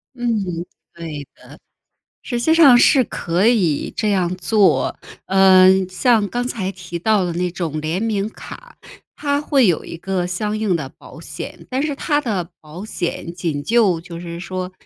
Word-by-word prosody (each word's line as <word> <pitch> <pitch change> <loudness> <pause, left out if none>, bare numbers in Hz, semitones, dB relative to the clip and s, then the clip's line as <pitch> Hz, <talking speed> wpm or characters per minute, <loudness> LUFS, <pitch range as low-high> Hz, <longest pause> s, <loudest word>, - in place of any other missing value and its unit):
嗯， 205 -9 -2 0.3
对 155 -4 -7
的， - - -19 0.8
实 240 -3 -3
际 320 +7 +3
上 285 -7 +7
是 260 +1 +5
可 175 -1 -1
以 190 -11 +1
这 215 - 0
样 185 -3 0
做。 200 +2 +2 0.3
呃， 190 -1 +6 0.2
像 215 +3 +2
刚 245 +3 -2
才 200 -6 -3
提 175 -2 -7
到 205 +1 +2
的 175 - -2
那 180 +1 -1
种 165 -3 -4
联 160 +6 -2
名 215 -2 -1
卡， 485 - -12 0.4
它 285 -1 -1
会 275 -4 +3
有 175 -5 +1
一 - - -8
个 185 0 -2
相 210 +4 -2
应 215 -4 0
的 150 -5 -5
保 - - -15
险， - - -9
但 260 +2 -1
是 300 -1 -1
它 290 +1 0
的 195 - -3
保 160 +6 -10
险 170 -4 -4
仅 165 -5 -3
就 205 -4 +2
就 170 0 -9
是 170 -1 -7
说， 185 +1 -5
190 Hz, 180 characters per minute, -19 LUFS, 170-230 Hz, 0.8 s, 上